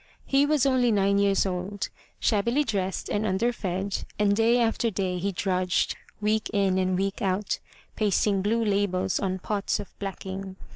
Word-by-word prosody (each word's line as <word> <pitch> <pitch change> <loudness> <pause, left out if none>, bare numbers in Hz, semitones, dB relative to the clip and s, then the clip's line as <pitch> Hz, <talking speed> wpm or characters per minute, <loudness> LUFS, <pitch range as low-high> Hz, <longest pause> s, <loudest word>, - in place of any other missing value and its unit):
He 275 +1 +3
was 295 -3 +3
only 255 -3 +3
nine 200 -1 +3
years 200 -1 +3
old, 190 +2 -3 0.3
shabbily 235 +7 +2
dressed 195 -7 -2
and 205 - -1
under 220 +4 +1
fed, 190 -2 -3
and 205 -1 +3
day 230 +3 +4
after 230 0 +1
day 185 -3 -2
he 200 +3 -1
drudged, 185 -1 0 0.2
week 215 +1 0
in 195 -3 +2
and 185 -1 +1
week 195 +1 -2
out, 195 +1 0 0.4
pasting 205 -1 +2
blue 225 +3 +1
labels 195 -3 +1
on 190 -1 -1
pots 200 +2 -1
of 205 - -8
blacking. 195 -1 -5
200 Hz, 160 wpm, -26 LUFS, 190-220 Hz, 0.4 s, day